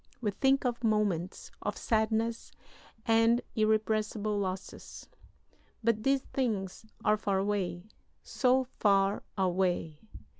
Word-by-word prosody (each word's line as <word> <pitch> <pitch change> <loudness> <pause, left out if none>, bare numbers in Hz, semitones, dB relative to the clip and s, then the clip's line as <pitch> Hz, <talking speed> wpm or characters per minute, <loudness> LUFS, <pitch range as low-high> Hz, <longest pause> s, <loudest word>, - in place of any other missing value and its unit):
We 215 -4 -1
think 270 +6 +2
of 240 -1 -1
moments 205 -5 0
of - - -3
sadness 225 +1 0 0.5
and 225 +1 +4 0.2
irrepressible 215 -1 +1
losses. 190 -1 -5 0.8
But 225 -1 +2
these 270 +2 +2
things 220 -5 -2 0.2
are 215 - +4
far 200 -2 0
away, 190 -3 -1 0.4
so 260 0 +2 0.2
far 195 -1 +3 0.2
away! 180 -4 0
215 Hz, 105 wpm, -30 LUFS, 195-230 Hz, 0.8 s, and